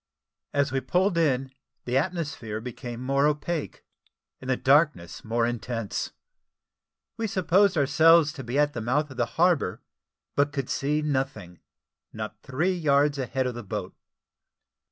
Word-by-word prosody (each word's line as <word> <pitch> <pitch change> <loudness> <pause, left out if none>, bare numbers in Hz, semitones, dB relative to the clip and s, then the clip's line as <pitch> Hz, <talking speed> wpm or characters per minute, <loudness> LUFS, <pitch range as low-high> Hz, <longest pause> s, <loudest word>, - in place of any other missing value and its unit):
As 140 -1 +1
we 135 0 0
pulled 180 +8 +1
in, 135 -5 +1 0.3
the 125 - -2
atmosphere 145 - -2
became 120 +1 -7
more 140 +2 +2
opaque, 150 +1 -3 0.5
and 130 - -8
the 130 - +2
darkness 140 - +2
more 115 +1 0
intense. 120 -2 -3 1.1
We 225 -1 -1
supposed 185 0 +3
ourselves 155 +2 +5
to 135 - -7
be 120 +3 -3
at 145 0 +3
the 120 - -4
mouth 140 +6 0
of 130 - -11
the 120 - +1
harbour, 165 - +2 0.5
but 145 0 +2
could 135 -3 -3
see 150 +2 0
nothing 130 - -3 0.5
not 110 -1 -7
three 155 +8 0
yards 145 -4 +2
a 130 - -2
head 130 0 -1
of 125 - -1
the 120 - -6
boat. 100 - -5
140 Hz, 150 wpm, -26 LUFS, 120-155 Hz, 1.1 s, ourselves